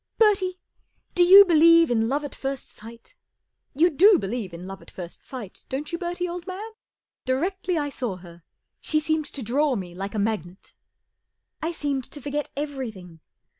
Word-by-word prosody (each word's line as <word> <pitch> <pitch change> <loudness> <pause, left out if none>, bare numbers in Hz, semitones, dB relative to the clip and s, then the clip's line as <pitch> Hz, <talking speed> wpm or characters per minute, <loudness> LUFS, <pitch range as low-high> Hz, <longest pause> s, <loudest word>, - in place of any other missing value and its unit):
Bertie, 385 -4 +3 0.6
do 360 - +1
you 385 +3 +10
believe 335 -2 +6
in 225 -1 +1
love 285 +3 0
at 290 - -6
first 270 -1 -5
sight? 230 - -13 0.6
You 340 +5 +4
do 385 +7 +6
believe 200 - -4
in 170 +2 -9
love 195 0 -8
at - - -15
first 175 -2 -9
sight, 240 -8 -9
don't 275 +3 -4
you, 340 - -3
Bertie, 355 0 -3
old 350 +1 -6
man? 400 +4 -6 0.5
Directly 355 +7 -1
I 290 -2 -2
saw 245 -8 -3
her, 175 -1 -14 0.4
she 310 - 0
seemed 315 0 0
to 275 - -7
draw 270 +5 +1
me 180 -5 -6
like 195 +4 -6
a - - -1
magnet. 200 -4 -3 0.9
I 325 - -1
seemed 285 -5 -2
to 295 - -9
forget 290 +2 -3
everything. 230 - -6
285 Hz, 170 wpm, -25 LUFS, 215-340 Hz, 0.9 s, you